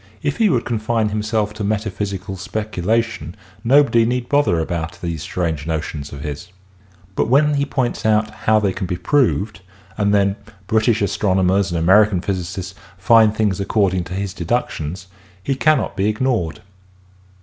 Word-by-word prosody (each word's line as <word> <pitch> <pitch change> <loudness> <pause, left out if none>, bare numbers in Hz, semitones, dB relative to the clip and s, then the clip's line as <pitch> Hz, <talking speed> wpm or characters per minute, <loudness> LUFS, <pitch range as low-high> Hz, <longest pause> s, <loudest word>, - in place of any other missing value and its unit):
If 145 -1 -1
he 220 -2 +3
would 125 -8 +1
confine 110 -1 0
himself 105 0 -1
to 110 -1 -5
metaphysical 100 -2 -3
speculation 105 -2 -2 0.3
nobody 130 -2 +4
need 125 +1 -1
bother 140 -12 +3
about 85 +1 -3
these 85 -4 -4
strange 80 -4 -3
notions 75 -3 -4
of 70 - -8
his. 75 0 -6 0.7
But - - 0
when 145 +5 +4
he 140 0 0
points 130 -3 -1
how 110 0 +2
they 100 -3 0
can 95 - -4
be 90 - -2
proved 105 -3 0 0.4
and 100 0 +2
then 100 0 +2 0.3
British 110 +1 +2
astronomers 95 -1 +1
and 85 - -2
American 95 +3 +4
physicists 95 0 -4 0.2
find 110 +3 +5
things 105 -4 0
according 95 -3 +1
to 90 +2 -6
his 100 -1 -3
deductions 90 -3 -3 0.4
he 135 - 0
cannot 155 +2 +1
be 100 +2 +1
ig 105 - -2
nored. 110 - -1
105 Hz, 150 wpm, -20 LUFS, 90-115 Hz, 0.7 s, find